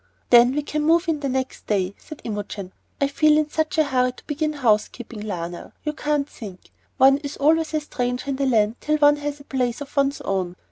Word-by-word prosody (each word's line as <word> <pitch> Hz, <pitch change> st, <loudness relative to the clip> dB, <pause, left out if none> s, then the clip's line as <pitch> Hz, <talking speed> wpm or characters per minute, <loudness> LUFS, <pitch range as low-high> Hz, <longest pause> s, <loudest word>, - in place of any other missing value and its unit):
"Then 245 Hz, +2 st, +7 dB
we 295 Hz, -, 0 dB
can 300 Hz, +1 st, -2 dB
move 335 Hz, +3 st, +3 dB
in 320 Hz, -2 st, 0 dB
the 280 Hz, -1 st, -2 dB
next 260 Hz, 0 st, -3 dB
day," 195 Hz, -2 st, 0 dB
said 310 Hz, -, -11 dB
Imogen. 205 Hz, -3 st, -5 dB, 0.3 s
"I 280 Hz, -, +3 dB
feel 300 Hz, +2 st, +3 dB
in 305 Hz, -1 st, 0 dB
such 315 Hz, 0 st, -1 dB
a 315 Hz, -, +5 dB
hurry 255 Hz, -3 st, +1 dB
to -, -, -17 dB
begin 305 Hz, +1 st, -1 dB
house 230 Hz, -7 st, +2 dB
keeping, 235 Hz, -2 st, -10 dB
Lionel, 175 Hz, -4 st, -6 dB
you 300 Hz, -, -2 dB
can't 295 Hz, -2 st, -1 dB
think. 200 Hz, -10 st, -11 dB, 0.3 s
One 270 Hz, 0 st, +6 dB
is 285 Hz, -1 st, -7 dB
always 315 Hz, +2 st, +2 dB
a 305 Hz, -, +1 dB
stranger 250 Hz, -2 st, -3 dB
in 265 Hz, -, -2 dB
the 275 Hz, 0 st, 0 dB
land 220 Hz, -2 st, +2 dB
till 305 Hz, 0 st, 0 dB
one 290 Hz, 0 st, +5 dB
has 290 Hz, 0 st, -4 dB
a -, -, -13 dB
place 250 Hz, -4 st, -1 dB
of 285 Hz, 0 st, -9 dB
one's 280 Hz, 0 st, +1 dB
own. 185 Hz, -2 st, -2 dB
275 Hz, 225 wpm, -23 LUFS, 230-300 Hz, 0.3 s, Then